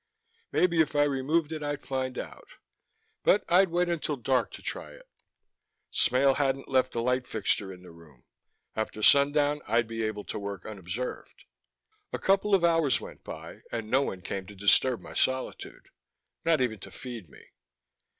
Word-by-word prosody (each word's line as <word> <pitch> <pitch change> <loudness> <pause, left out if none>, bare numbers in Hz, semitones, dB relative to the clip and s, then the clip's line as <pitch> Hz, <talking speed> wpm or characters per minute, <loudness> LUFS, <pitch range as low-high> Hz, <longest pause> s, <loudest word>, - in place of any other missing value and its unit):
Maybe 170 -2 +3
if 155 -1 0
I 145 - +5
removed 145 +3 +1
it 155 -1 -4
I'd 145 -1 -3
find 130 -1 -2
out. - - -7 0.7
But 205 - +4
I'd 185 +2 +5
wait 175 +1 +1
until 165 -3 -1
dark 130 +1 +1
to - - -10
try - - -5
it. - - -16 0.8
Smale 135 +2 +3
hadn't 135 -1 0
left 130 -1 +1
a - - 0
light 125 +1 0
fixture 100 -2 -1
in 90 -1 -12
the 90 - -12
room. 80 -6 -18 0.5
After 110 -1 -3
sundown 145 +2 +5
I'd 115 +2 +2
be 115 0 -4
able 110 -2 -2
to - - -5
work 100 -2 -6
unobserved. 105 +4 -6 0.7
A - - -2
couple 195 +1 +3
of 185 - +1
hours 165 -7 +3
went - - -11
by 80 +1 -9
and 115 -2 -4
no 135 +2 +5
one 95 -9 -4
came 95 0 -4
to 105 - -11
disturb 105 +5 +3
my - - -10
solitude, 130 0 -2 0.5
not 165 -3 +3
even 110 -5 0
to - - -10
feed 120 - -8
me. - - -17
130 Hz, 170 wpm, -28 LUFS, 110-150 Hz, 0.8 s, I